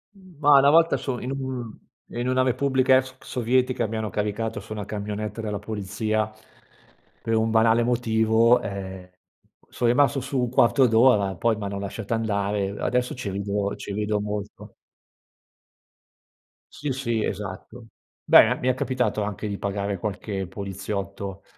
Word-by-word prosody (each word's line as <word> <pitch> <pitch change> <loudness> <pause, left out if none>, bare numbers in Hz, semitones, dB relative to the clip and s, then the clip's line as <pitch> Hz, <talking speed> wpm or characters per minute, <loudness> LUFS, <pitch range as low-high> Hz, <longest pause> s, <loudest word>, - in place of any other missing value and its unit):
Ma 150 -7 +3
una 140 +1 +5
volta 165 +2 +5
so 125 -3 -3
in 125 - -5
un 130 -4 -5 0.4
in 120 +1 -2
una 130 0 +2
repubblica 130 0 +3
ex 130 0 -4
sovietica, 125 0 0
mi 110 - -5
hanno 110 -1 -3
caricato 105 +1 -2
su 110 +2 -14
una 105 -2 -4
camionetta 105 +1 -4
della 105 -2 -3
polizia, 110 +1 -2 0.9
per 115 - 0
un 110 0 +2
banale 115 +1 +4
motivo, 115 0 +3
ehm, 95 -3 -6 0.6
sono 120 - 0
rimasto 140 +2 +3
su 135 +1 -2
un 125 -1 0
quarto 130 +2 +4
d'ora, 110 -4 +4
poi 115 +6 +1
m'hanno 100 -1 -4
lasciata 100 +2 -4
andare, 100 -3 -1
adesso 125 +1 -1
ci 125 -6 -5
rido 100 +1 -2
ci 100 - -7
rido 105 0 -1
molto. 105 0 -6 2.0
Sì, 145 -1 -3
sì, 120 -4 -1
esatto. 105 +4 -6 0.3
Beh, - - +7
e - - +1
mi 125 - -4
è 130 - +4
capitato 125 -4 -1
anche 105 0 -3
di 100 -1 -4
pagare 100 -1 -2
qualche 100 0 -4
poliziotto, 100 0 -5
110 Hz, 145 wpm, -24 LUFS, 100-125 Hz, 2.0 s, Beh